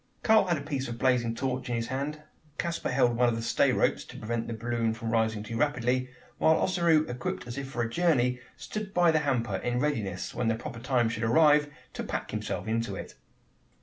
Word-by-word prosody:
Karl 220 Hz, -2 st, +5 dB
had 170 Hz, -2 st, +2 dB
a -, -, -5 dB
piece 140 Hz, -2 st, -3 dB
of 120 Hz, 0 st, -5 dB
blazing 120 Hz, -3 st, +2 dB
torch 130 Hz, 0 st, -2 dB
in 120 Hz, -, 0 dB
his 115 Hz, 0 st, -2 dB
hand; 145 Hz, +3 st, -3 dB, 0.3 s
Caspar 170 Hz, -1 st, -2 dB
held 125 Hz, -2 st, +3 dB
one 120 Hz, +1 st, +4 dB
of 115 Hz, -, -1 dB
the 115 Hz, -, -4 dB
stay -, -, +3 dB
ropes, -, -, +1 dB
to -, -, -11 dB
prevent 115 Hz, +1 st, -3 dB
the 115 Hz, -, -3 dB
balloon 115 Hz, 0 st, -1 dB
from 115 Hz, 0 st, -4 dB
rising 110 Hz, -2 st, +1 dB
too 115 Hz, +2 st, -5 dB
rapidly; 130 Hz, -2 st, +1 dB, 0.3 s
while 160 Hz, -, +5 dB
Ossaroo, 170 Hz, -4 st, +3 dB
equipped 125 Hz, 0 st, -4 dB
as 120 Hz, 0 st, -6 dB
if 140 Hz, -1 st, -5 dB
for 120 Hz, -3 st, -2 dB
a -, -, -1 dB
journey, 125 Hz, -7 st, +2 dB, 0.2 s
stood 195 Hz, +10 st, -6 dB
by 175 Hz, -1 st, +5 dB
the 160 Hz, -, +3 dB
hamper, 120 Hz, -9 st, 0 dB
in 120 Hz, +5 st, -1 dB
readiness, 110 Hz, -11 st, -2 dB
when 120 Hz, -, -1 dB
the 115 Hz, -, +2 dB
proper 120 Hz, +1 st, -7 dB
time 125 Hz, -1 st, +1 dB
should 115 Hz, -1 st, -3 dB
arrive, 150 Hz, +5 st, +4 dB, 0.2 s
to -, -, -4 dB
"pack" -, -, -4 dB
himself -, -, -3 dB
into 115 Hz, -2 st, -1 dB
it. -, -, -7 dB
125 Hz, 215 wpm, -28 LUFS, 115-150 Hz, 0.3 s, Karl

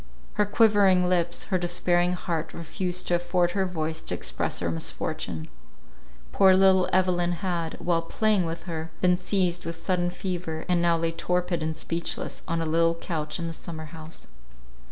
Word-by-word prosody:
Her 210 Hz, -, +1 dB
quivering 205 Hz, -4 st, +4 dB
lips, 175 Hz, -1 st, +1 dB
her 185 Hz, -, +3 dB
despairing 175 Hz, 0 st, +1 dB
heart 165 Hz, -3 st, -3 dB
refused 180 Hz, +2 st, -3 dB
to -, -, +1 dB
afford 175 Hz, 0 st, +1 dB
her 190 Hz, 0 st, 0 dB
voice 160 Hz, -2 st, -3 dB
to -, -, -3 dB
express -, -, -1 dB
our 85 Hz, -1 st, -1 dB
misfortune. 80 Hz, 0 st, -3 dB, 0.8 s
Poor 190 Hz, -1 st, +6 dB
little 190 Hz, -1 st, +5 dB
Evelyn 175 Hz, -1 st, +2 dB
had, 170 Hz, -3 st, -2 dB
while 170 Hz, -1 st, 0 dB
playing 200 Hz, +1 st, +1 dB
with 165 Hz, +1 st, -5 dB
her, 165 Hz, -2 st, -5 dB
been 180 Hz, -1 st, +4 dB
seized 180 Hz, -1 st, 0 dB
with 165 Hz, 0 st, -4 dB
sudden 175 Hz, +1 st, 0 dB
fever, 175 Hz, -3 st, -4 dB
and 175 Hz, -1 st, +2 dB
now 170 Hz, -1 st, +3 dB
lay 165 Hz, 0 st, 0 dB
torpid 180 Hz, 0 st, -1 dB
and 160 Hz, 0 st, -2 dB
speechless 170 Hz, +1 st, -3 dB
on 165 Hz, 0 st, 0 dB
a -, -, -2 dB
little 165 Hz, +1 st, +2 dB
couch 155 Hz, -2 st, -3 dB
in 170 Hz, -, -4 dB
the 165 Hz, -, -4 dB
summer 160 Hz, -1 st, -7 dB
house. 160 Hz, 0 st, -9 dB
175 Hz, 170 wpm, -26 LUFS, 165-180 Hz, 0.8 s, Poor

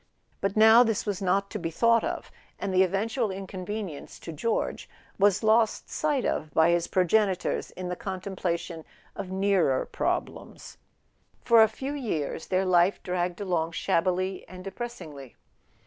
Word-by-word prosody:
But 195 Hz, +1 st, -2 dB
now 220 Hz, +2 st, +8 dB
this 225 Hz, -4 st, +1 dB
was 205 Hz, -2 st, -3 dB
not 195 Hz, +1 st, +1 dB
to 210 Hz, -, -4 dB
be 165 Hz, -2 st, -3 dB
thought 230 Hz, +7 st, +3 dB
of, -, -, -4 dB, 0.3 s
and 195 Hz, -1 st, -3 dB
the 185 Hz, -, +5 dB
even¬ 195 Hz, +2 st, +2 dB
tual 225 Hz, -2 st, -1 dB
inconvenience 190 Hz, -3 st, -6 dB
to 165 Hz, -, -7 dB
George 225 Hz, +9 st, -2 dB, 0.3 s
was 205 Hz, +1 st, +3 dB
lost 220 Hz, 0 st, +2 dB
sight 295 Hz, -5 st, 0 dB
of 155 Hz, -, -2 dB
by 160 Hz, +1 st, +5 dB
his 170 Hz, 0 st, +1 dB
progenitors 185 Hz, +1 st, +1 dB
in 185 Hz, 0 st, -7 dB
the 180 Hz, -, -2 dB
contemplation 180 Hz, -3 st, -4 dB, 0.3 s
of 195 Hz, -2 st, -6 dB
nearer 190 Hz, -7 st, +1 dB
prob¬ -, -, 0 dB
lems. -, -, -12 dB, 0.7 s
For 230 Hz, -2 st, +7 dB
a 220 Hz, -, +7 dB
few 265 Hz, +6 st, -5 dB
years 185 Hz, -, -3 dB
their 190 Hz, 0 st, +1 dB
life 180 Hz, +1 st, +3 dB
dragged 180 Hz, +1 st, -2 dB
along 170 Hz, -4 st, -1 dB
shabbily 185 Hz, +3 st, 0 dB
and 185 Hz, 0 st, -10 dB
depressingly. 185 Hz, -, -8 dB
190 Hz, 155 wpm, -27 LUFS, 175-215 Hz, 0.7 s, now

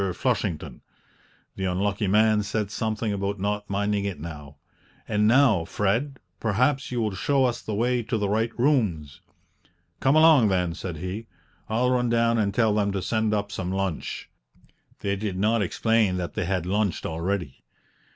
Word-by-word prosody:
Flushington" 85 Hz, -, -2 dB, 0.7 s
(the 95 Hz, -, -3 dB
unlucky 100 Hz, +3 st, 0 dB
man 105 Hz, +2 st, +4 dB
said 105 Hz, 0 st, -2 dB
something 110 Hz, 0 st, -2 dB
about 100 Hz, 0 st, -2 dB
not 105 Hz, +1 st, -2 dB
minding 100 Hz, 0 st, 0 dB
it 100 Hz, -3 st, -4 dB
now); 75 Hz, -2 st, -8 dB, 0.5 s
"and 105 Hz, 0 st, +2 dB
now, 120 Hz, -7 st, +4 dB
Fred, 115 Hz, -, -1 dB, 0.2 s
perhaps 125 Hz, +6 st, +1 dB
you 125 Hz, -, -1 dB
will 110 Hz, -3 st, 0 dB
show 135 Hz, +7 st, +1 dB
us 120 Hz, -1 st, -1 dB
the 110 Hz, -, -4 dB
way 120 Hz, +3 st, +1 dB
to 115 Hz, 0 st, -2 dB
the 105 Hz, -1 st, 0 dB
right 110 Hz, +3 st, +1 dB
rooms?" 105 Hz, -, 0 dB, 0.8 s
"Come 135 Hz, +2 st, +3 dB
along, 155 Hz, -7 st, +6 dB
then!" 90 Hz, -3 st, 0 dB
said 85 Hz, -1 st, -6 dB
he; 95 Hz, +7 st, -5 dB, 0.4 s
"I'll 125 Hz, +3 st, +1 dB
run 125 Hz, -1 st, +1 dB
down 115 Hz, 0 st, +2 dB
and 100 Hz, -2 st, +1 dB
tell 110 Hz, 0 st, +2 dB
them 105 Hz, -1 st, +1 dB
to 95 Hz, -, -2 dB
send 110 Hz, -1 st, 0 dB
up 100 Hz, -1 st, -1 dB
some 95 Hz, -3 st, -3 dB
lunch" 95 Hz, -4 st, -3 dB, 0.7 s
(they 100 Hz, 0 st, 0 dB
did 100 Hz, -2 st, -3 dB
not 110 Hz, +3 st, +2 dB
explain 105 Hz, -1 st, +1 dB
that 90 Hz, -1 st, -4 dB
they -, -, -2 dB
had 90 Hz, -1 st, -1 dB
lunched 100 Hz, +1 st, -1 dB
already). 90 Hz, -2 st, -3 dB
105 Hz, 165 wpm, -25 LUFS, 95-115 Hz, 0.8 s, along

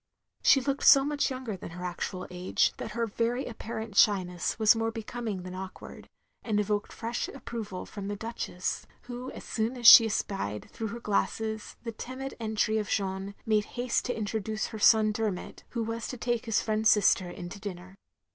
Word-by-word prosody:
She 270 Hz, -, +6 dB
looked 275 Hz, +1 st, -2 dB
so 275 Hz, 0 st, +8 dB
much 290 Hz, -1 st, 0 dB
younger 255 Hz, -5 st, -4 dB
than 180 Hz, -, -8 dB
her 180 Hz, +2 st, -7 dB
actual 185 Hz, +1 st, -4 dB
age 180 Hz, +1 st, +1 dB
that 215 Hz, -, -6 dB
her 230 Hz, +1 st, 0 dB
very 235 Hz, +4 st, -1 dB
apparent 220 Hz, -2 st, -6 dB
shyness 185 Hz, -5 st, +3 dB
was 220 Hz, 0 st, +6 dB
more 225 Hz, 0 st, 0 dB
becoming 225 Hz, -3 st, -5 dB
than 185 Hz, 0 st, -7 dB
awkward, 190 Hz, 0 st, -9 dB, 0.3 s
and 215 Hz, -3 st, 0 dB
evoked 205 Hz, 0 st, -1 dB
fresh 235 Hz, +1 st, -3 dB
approval 220 Hz, -8 st, -6 dB
from 200 Hz, -2 st, -7 dB
the 205 Hz, -, -3 dB
Duchess; 220 Hz, -4 st, -4 dB, 0.2 s
who 250 Hz, +1 st, -6 dB
as -, -, -9 dB
soon 230 Hz, +2 st, -2 dB
as 240 Hz, -, -7 dB
she 225 Hz, 0 st, +11 dB
espied, 105 Hz, -, -3 dB
through 225 Hz, -, -4 dB
her 230 Hz, +3 st, -6 dB
glasses, 220 Hz, 0 st, -2 dB
the 230 Hz, -, -4 dB
timid 260 Hz, +4 st, -6 dB
entry 220 Hz, -1 st, 0 dB
of 210 Hz, -, -4 dB
Jeanne, 195 Hz, 0 st, -2 dB
made 215 Hz, -1 st, +2 dB
haste 245 Hz, 0 st, +1 dB
to 245 Hz, -, -2 dB
introduce 215 Hz, 0 st, -2 dB
her 220 Hz, -, -7 dB
son 215 Hz, 0 st, +6 dB
Der 220 Hz, 0 st, 0 dB
mot, 180 Hz, -, -8 dB
who 235 Hz, -2 st, -2 dB
was 225 Hz, +1 st, -4 dB
to 250 Hz, -, -6 dB
take 240 Hz, 0 st, -2 dB
his 225 Hz, -, +2 dB
friend's 215 Hz, 0 st, +2 dB
sister 190 Hz, -3 st, +4 dB
in 175 Hz, 0 st, -7 dB
to 200 Hz, -, -9 dB
dinner. 185 Hz, -2 st, -7 dB
220 Hz, 190 wpm, -29 LUFS, 200-235 Hz, 0.3 s, she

